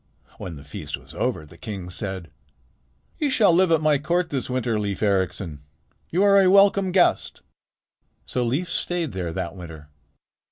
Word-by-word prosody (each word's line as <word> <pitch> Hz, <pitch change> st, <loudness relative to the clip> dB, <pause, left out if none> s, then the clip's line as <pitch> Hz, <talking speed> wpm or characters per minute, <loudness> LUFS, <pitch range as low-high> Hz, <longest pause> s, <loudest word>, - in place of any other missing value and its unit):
When 85 Hz, -, -6 dB
the 70 Hz, -, -11 dB
feast 75 Hz, -, -6 dB
was -, -, -15 dB
over 80 Hz, -, -2 dB
the 75 Hz, -, -17 dB
king 95 Hz, -5 st, -6 dB
said: 95 Hz, -3 st, -5 dB, 0.9 s
"You 295 Hz, -, +1 dB
shall 210 Hz, -9 st, +4 dB
live 180 Hz, 0 st, +4 dB
at 160 Hz, -2 st, +4 dB
my 150 Hz, -2 st, +3 dB
court 175 Hz, +4 st, 0 dB
this 135 Hz, -3 st, -2 dB
winter, 125 Hz, -3 st, 0 dB
Leif 100 Hz, 0 st, -3 dB
Ericsson. 95 Hz, -6 st, -1 dB, 0.5 s
You 180 Hz, +4 st, +2 dB
are 200 Hz, -1 st, +6 dB
a 185 Hz, -, +5 dB
welcome 195 Hz, -1 st, +5 dB
guest." 180 Hz, -1 st, +2 dB, 0.8 s
So 125 Hz, -, -1 dB
Leif 135 Hz, +10 st, -1 dB
stayed 170 Hz, -2 st, -2 dB
there 90 Hz, -3 st, -4 dB
that 85 Hz, +1 st, -4 dB
winter. 80 Hz, -5 st, -10 dB
125 Hz, 165 wpm, -24 LUFS, -, 0.9 s, are